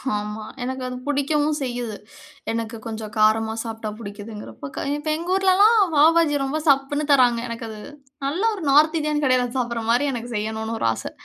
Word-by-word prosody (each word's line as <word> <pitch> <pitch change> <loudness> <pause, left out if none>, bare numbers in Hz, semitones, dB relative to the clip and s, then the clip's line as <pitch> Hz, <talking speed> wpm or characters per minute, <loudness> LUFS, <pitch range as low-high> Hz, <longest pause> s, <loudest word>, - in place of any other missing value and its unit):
ஆமா. 210 +1 -4 0.2
எனக்கு 260 +1 -4
அது 250 - -5
பிடிக்கவும் 295 +1 +1
செய்யுது. 245 -4 -3 0.6
எனக்கு 230 0 -3
கொஞ்சம் 220 -1 -6
காரமா 220 +1 +3
சாப்பிட்டா 225 -1 -5
பிடிக்கிதுங்குறப்போ 205 - -8 0.3
இப்போ 310 - -2
எங்க 340 +2 -6
ஊர்லல்லாம் 390 +4 +5 0.2
பாவுபாஜி 315 0 +5
ரொம்ப 300 +4 -2
சப்புன்னு 280 +2 +2
தராங்க. 245 -3 +4
எனக்கு 230 0 -5
அது, 215 -1 -8 0.5
நல்ல 305 +8 -1
ஒரு 375 - -7
நார்த் 310 +3 +5
இந்தியன் 300 -1 -1
கடையில 255 -1 +3
சாப்பிடுற 235 -2 -2
மாரி 285 +5 +2
எனக்கு 240 0 -5
செய்யனுன்னு 220 +1 -3
ஒரு - - +1
ஆசை. - - -6
245 Hz, 160 wpm, -23 LUFS, 220-295 Hz, 0.6 s, ஊர்லல்லாம்